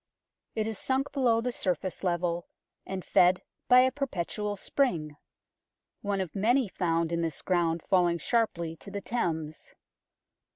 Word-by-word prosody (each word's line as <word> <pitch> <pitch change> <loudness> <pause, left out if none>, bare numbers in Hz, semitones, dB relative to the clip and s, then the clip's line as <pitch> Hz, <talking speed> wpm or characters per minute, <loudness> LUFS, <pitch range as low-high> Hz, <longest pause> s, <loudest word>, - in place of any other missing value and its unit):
It 220 - 0
is 220 -2 -4
sunk 270 +2 0
below 240 -5 +2
the 250 +1 -1
surface 185 -4 -2
level, 175 -1 0 0.4
and 190 -1 -4
fed 180 +1 +4 0.2
by 250 0 +8
a 260 0 +3
perpetual 210 -6 -3
spring 175 - 0 0.9
one 200 -1 -1
of 180 -5 -5
many 235 +5 +3
found 165 -3 0
in 170 0 0
this 165 -4 -3
ground 170 -3 +1
falling 175 -2 +3
sharply 170 -7 0
to 200 - -11
the 200 0 -5
Thames. 160 -9 -3
185 Hz, 140 wpm, -29 LUFS, 170-230 Hz, 0.9 s, by